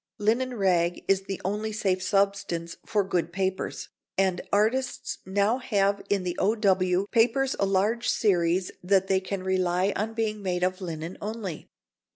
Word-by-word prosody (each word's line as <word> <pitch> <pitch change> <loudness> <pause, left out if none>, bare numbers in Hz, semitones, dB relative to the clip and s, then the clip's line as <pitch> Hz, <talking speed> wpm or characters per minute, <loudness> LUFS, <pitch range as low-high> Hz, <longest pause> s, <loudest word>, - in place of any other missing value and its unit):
Linen 235 +4 +1
rag 175 -4 +1
is 195 0 +2
the 195 -1 -4
only 210 +3 -1
safe 195 -3 0
substance 195 -3 0
for 215 -2 +2
good 175 -3 -1
papers, 190 0 -2 0.3
and 190 -2 +2
artists 235 +6 0
now 200 +6 +2
have 200 -5 +1
in 200 -2 +1
the 180 -1 -2
O.W. 190 -3 +2
papers 250 +3 +3
a 195 - +2
large 210 +5 +1
series 180 -3 +2
that 190 +1 +3
they 190 0 +2
can 190 0 -5
rely 185 +1 +1
on 220 +2 -2
being 215 -2 -1
made 180 -2 -1
of 185 +1 0
linen 165 0 -5
only. 210 -6 -5
195 Hz, 155 wpm, -27 LUFS, 185-215 Hz, 0.3 s, papers